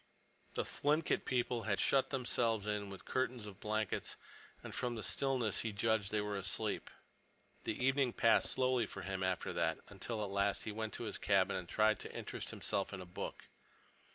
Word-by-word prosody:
The -, -, +1 dB
Thlinkit 150 Hz, +3 st, +1 dB
people 125 Hz, -1 st, +1 dB
had 100 Hz, -, +2 dB
shut 135 Hz, -1 st, +4 dB
themselves 120 Hz, -5 st, +1 dB
in 105 Hz, -1 st, -1 dB
with 95 Hz, -2 st, -8 dB
a -, -, -21 dB
curtain 130 Hz, -1 st, 0 dB
of 100 Hz, -1 st, -10 dB
blankets, 110 Hz, -1 st, -1 dB, 0.5 s
and -, -, -7 dB
from 120 Hz, -1 st, -1 dB
the 110 Hz, -, -4 dB
stillness 125 Hz, -6 st, +1 dB
he 110 Hz, -, -1 dB
judged 105 Hz, -1 st, +1 dB
they 105 Hz, -1 st, +2 dB
were 105 Hz, 0 st, -2 dB
asleep. 95 Hz, -2 st, -1 dB, 0.8 s
The -, -, -1 dB
evening 135 Hz, -1 st, +3 dB
passed 115 Hz, -, +4 dB
slowly 130 Hz, -3 st, +2 dB
for 100 Hz, -, -7 dB
him 95 Hz, -1 st, -3 dB
after 95 Hz, -1 st, 0 dB
that, -, -, +1 dB
until 110 Hz, -3 st, -3 dB
at 100 Hz, -, -3 dB
last 100 Hz, 0 st, +1 dB
he 110 Hz, -, -3 dB
went 110 Hz, +1 st, -3 dB
to -, -, -4 dB
his 110 Hz, -, -4 dB
cabin 100 Hz, -1 st, +3 dB
and 90 Hz, -2 st, -4 dB
tried 110 Hz, 0 st, +4 dB
to -, -, -8 dB
interest -, -, -4 dB
himself 100 Hz, -, -1 dB
in 95 Hz, -, -4 dB
a 90 Hz, -, -6 dB
book. 90 Hz, -, -6 dB
110 Hz, 190 wpm, -36 LUFS, 100-120 Hz, 0.8 s, shut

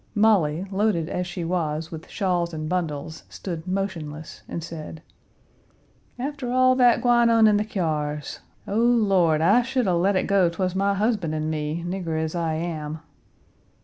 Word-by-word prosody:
Molly, 190 Hz, -6 st, +3 dB
loaded 190 Hz, -5 st, 0 dB
as 180 Hz, 0 st, -2 dB
she 180 Hz, -2 st, -5 dB
was 165 Hz, -2 st, -2 dB
with 160 Hz, -1 st, -9 dB
shawls 175 Hz, -4 st, -1 dB
and 155 Hz, 0 st, -4 dB
bundles, 160 Hz, -3 st, -3 dB
stood 170 Hz, -3 st, -6 dB
motionless, 165 Hz, -6 st, -4 dB
and 170 Hz, -, -4 dB
said: 160 Hz, -1 st, -8 dB, 1.1 s
"After 265 Hz, -1 st, -4 dB
all 255 Hz, 0 st, +4 dB
that 245 Hz, -1 st, +4 dB
gwine 240 Hz, -1 st, +4 dB
on 225 Hz, -1 st, +5 dB
in 210 Hz, -1 st, +5 dB
the 210 Hz, -, +1 dB
kyars! 150 Hz, -8 st, -3 dB, 0.3 s
O, 205 Hz, -, -2 dB
Lord, 195 Hz, -10 st, +3 dB
I 200 Hz, +9 st, +5 dB
should 255 Hz, 0 st, -1 dB
a 185 Hz, -, +2 dB
let 185 Hz, +4 st, +2 dB
it 185 Hz, -, +2 dB
go 195 Hz, -3 st, +3 dB
'twas 180 Hz, +1 st, -2 dB
my 200 Hz, +1 st, +1 dB
husband 200 Hz, -6 st, 0 dB
and 155 Hz, 0 st, -2 dB
me! 155 Hz, +2 st, -3 dB
nigger 175 Hz, -3 st, -2 dB
as 160 Hz, 0 st, -2 dB
I 165 Hz, -2 st, -1 dB
am." 155 Hz, -2 st, -4 dB
180 Hz, 165 wpm, -24 LUFS, 160-205 Hz, 1.1 s, on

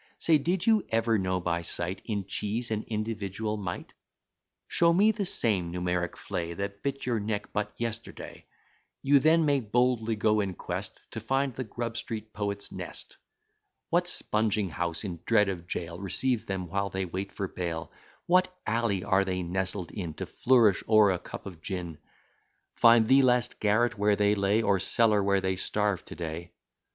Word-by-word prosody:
Say, 160 Hz, -2 st, +4 dB
did 170 Hz, +5 st, 0 dB
you 220 Hz, -3 st, +4 dB
ever 115 Hz, -1 st, +2 dB
know 95 Hz, -1 st, 0 dB
by 85 Hz, -1 st, -1 dB
sight 85 Hz, +2 st, -3 dB
In 100 Hz, -4 st, -2 dB
cheese 110 Hz, +5 st, -2 dB
an 110 Hz, -1 st, -2 dB
individual 110 Hz, -1 st, -3 dB
mite! 105 Hz, -2 st, -5 dB, 0.7 s
Show 170 Hz, 0 st, +3 dB
me 205 Hz, +5 st, +5 dB
the 205 Hz, -3 st, -2 dB
same 95 Hz, -, +2 dB
numeric 90 Hz, 0 st, -1 dB
flea, 85 Hz, 0 st, -4 dB
That 100 Hz, +1 st, -5 dB
bit 140 Hz, 0 st, -3 dB
your 120 Hz, -3 st, 0 dB
neck 105 Hz, 0 st, -3 dB
but 105 Hz, 0 st, -1 dB
yesterday: 115 Hz, -1 st, -6 dB, 0.6 s
You 140 Hz, +1 st, +5 dB
then 160 Hz, +3 st, +4 dB
may 145 Hz, -2 st, +3 dB
boldly 120 Hz, -1 st, +1 dB
go 105 Hz, 0 st, +2 dB
in 95 Hz, -3 st, -1 dB
quest -, -, -5 dB
To -, -, -5 dB
find 135 Hz, 0 st, 0 dB
the 130 Hz, -, -4 dB
Grub 115 Hz, 0 st, -5 dB
Street 110 Hz, -1 st, -5 dB
poet's 100 Hz, -1 st, -3 dB
nest; -, -, -6 dB, 0.7 s
What -, -, +3 dB
spunging 105 Hz, -3 st, 0 dB
house, 85 Hz, +2 st, -3 dB
in 90 Hz, -5 st, -5 dB
dread 105 Hz, -2 st, +3 dB
of 85 Hz, -3 st, -5 dB
jail, 85 Hz, -1 st, -4 dB
Receives 115 Hz, +5 st, -1 dB
them, 95 Hz, -2 st, -3 dB
while 100 Hz, +3 st, -1 dB
they 95 Hz, 0 st, -2 dB
wait 95 Hz, +3 st, -5 dB
for 100 Hz, -, -3 dB
bail; 85 Hz, -4 st, -4 dB, 0.3 s
What 185 Hz, +1 st, +3 dB
alley 110 Hz, -4 st, 0 dB
are 95 Hz, +1 st, +3 dB
they 95 Hz, -1 st, -2 dB
nestled 95 Hz, +1 st, -2 dB
in, 85 Hz, -6 st, -5 dB
To -, -, -4 dB
flourish 115 Hz, -7 st, +3 dB
o'er 110 Hz, -2 st, +6 dB
a 90 Hz, -, -1 dB
cup -, -, -9 dB
of 90 Hz, -5 st, -9 dB
gin; 90 Hz, -4 st, -5 dB, 0.7 s
Find 115 Hz, -1 st, +6 dB
the 135 Hz, +2 st, +6 dB
last 125 Hz, -2 st, +2 dB
garret 110 Hz, +2 st, +2 dB
where 105 Hz, 0 st, +3 dB
they 105 Hz, 0 st, +3 dB
lay, 100 Hz, +2 st, +2 dB
Or 100 Hz, -2 st, +2 dB
cellar 105 Hz, +2 st, +3 dB
where 100 Hz, 0 st, +2 dB
they 95 Hz, 0 st, -1 dB
starve 105 Hz, -1 st, 0 dB
to -, -, -9 dB
day. 85 Hz, +1 st, -6 dB
105 Hz, 175 wpm, -28 LUFS, 95-115 Hz, 0.7 s, o'er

